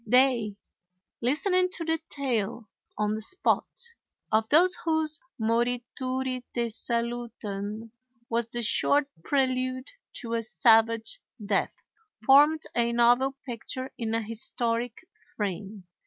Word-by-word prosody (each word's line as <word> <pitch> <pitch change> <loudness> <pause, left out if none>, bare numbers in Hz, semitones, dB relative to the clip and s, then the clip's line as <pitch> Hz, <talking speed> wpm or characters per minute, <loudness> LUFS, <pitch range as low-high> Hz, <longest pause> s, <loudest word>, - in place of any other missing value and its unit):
They, 245 -3 +3 0.7
listening 365 - +2
to 335 - -2
the 325 0 0
tale, 235 -5 -2 0.3
on 210 0 0
the 220 - -3
spot, 370 - 0 0.6
of 220 +1 +2
those 355 +5 +6
whose 315 -2 +2 0.2
"morituri 245 +3 -1
te 235 -1 0
salutant" 230 -2 -4 0.4
was 235 0 -1
the 240 0 -3
short 285 +6 +4 0.2
prelude 255 0 0 0.2
to 230 -3 -5
a 230 - +1
savage 225 - +3 0.3
death, 200 -1 0 0.5
formed 295 +4 +6
a 235 0 +1
novel 245 +3 +3
picture 255 +2 -5
in 225 -1 -2
a 230 - 0
historic 230 - -2 0.3
frame. 200 0 -4
240 Hz, 110 wpm, -27 LUFS, 225-265 Hz, 0.7 s, those